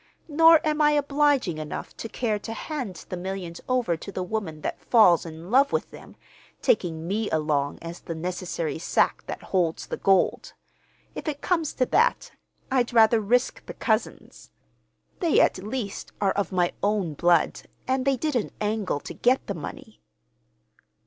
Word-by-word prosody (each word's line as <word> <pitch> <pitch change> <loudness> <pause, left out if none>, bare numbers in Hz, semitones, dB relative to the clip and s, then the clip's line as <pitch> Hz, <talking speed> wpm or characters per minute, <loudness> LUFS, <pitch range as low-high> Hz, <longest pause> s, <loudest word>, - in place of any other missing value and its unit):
Nor 325 +1 +6
am 305 0 +1
I 300 0 +5
obliging 285 - +2
enough 155 -1 -6
to 225 - -6
care 220 -4 -1
to 225 +2 -6
hand 240 - -5
the - - -3
millions 180 -1 -5
over 250 -9 +1
to 180 +5 -9
the 185 -1 -3
woman 180 -6 -4
that - - -4
falls 180 -8 +5
in 165 +4 -9
love 275 +3 +5
with - - -1
them, - - -13 0.4
taking 165 - 0
me 210 +3 -1
along 150 -2 0
as 170 +1 -7
the 165 - -6
necessary 175 -1 -3
sack - - +1
that - - -6
holds 175 -4 0
the - - -5
gold. 195 -1 +2 0.6
If - - -7
it 290 -2 -3
comes 330 -5 0
to 255 - +2
that, 475 - +2 0.4
I'd 245 -2 +1
rather 225 -1 +5
risk 245 +5 +1
the - - -7
cousins. 220 -2 -2 0.7
They, 335 -5 +3
at - - +3
least, 210 +1 -5
are 195 -2 +2
of 200 +1 -2
my 180 -2 +1
own 200 -6 0
blood, 170 +2 +2 0.3
and 260 0 +1
they 270 -1 +2
didn't 255 -5 -1
angle 210 -8 -1
to - - -8
get 255 +2 +2
the 200 - -3
money." 150 - -9
210 Hz, 165 wpm, -25 LUFS, 175-260 Hz, 0.7 s, Nor